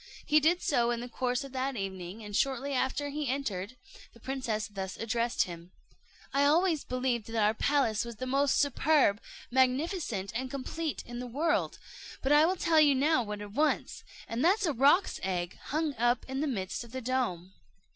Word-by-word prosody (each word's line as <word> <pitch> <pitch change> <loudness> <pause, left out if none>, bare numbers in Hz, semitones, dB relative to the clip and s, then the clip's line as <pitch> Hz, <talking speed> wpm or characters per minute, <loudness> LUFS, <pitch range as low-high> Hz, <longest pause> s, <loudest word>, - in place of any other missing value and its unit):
He 305 - +5
did 335 +4 +2
so 240 -5 +2
in 240 -1 -1
the 245 - -5
course 250 +2 -1
of 275 - -9
that 265 +1 -2
evening, 195 0 -5
and 205 -1 -6
shortly 275 +3 0
after 265 +2 -1
he 295 0 -3
entered, 245 -5 -3 0.4
the 235 - -17
princess 245 -4 -2
thus 195 -2 -6
addressed 230 +1 0
him: 170 0 -10 0.6
"I 280 +1 +3
always 320 +2 +3
believed 250 -3 -1
that 230 - -7
our 210 +1 +3
palace 230 -3 +1
was 235 -1 -7
the 255 - -5
most 275 +2 +2
superb, 285 -6 +3 0.3
magnificent, 260 - +1
and 255 +3 -3
complete 290 +4 -4
in 240 0 -7
the 250 - -5
world: 290 +8 0 0.5
but 270 - +1
I 300 +2 +6
will 370 - +1
tell 335 -3 +3
you 290 -2 +5
now 285 +1 +3
what 210 -2 -5
it 205 -1 -8
wants, 300 +7 0 0.2
and 230 +2 -2
that 385 +6 +4
is - - +1
a 315 - +1
roc's 285 - +3
egg 180 -2 -2
hung 305 0 -1
up 240 +1 +2
in 265 0 -3
the 305 - 0
midst 190 -6 -3
of 235 0 -14
the 260 - -4
dome." 225 -8 -2
255 Hz, 195 wpm, -30 LUFS, 225-285 Hz, 0.6 s, I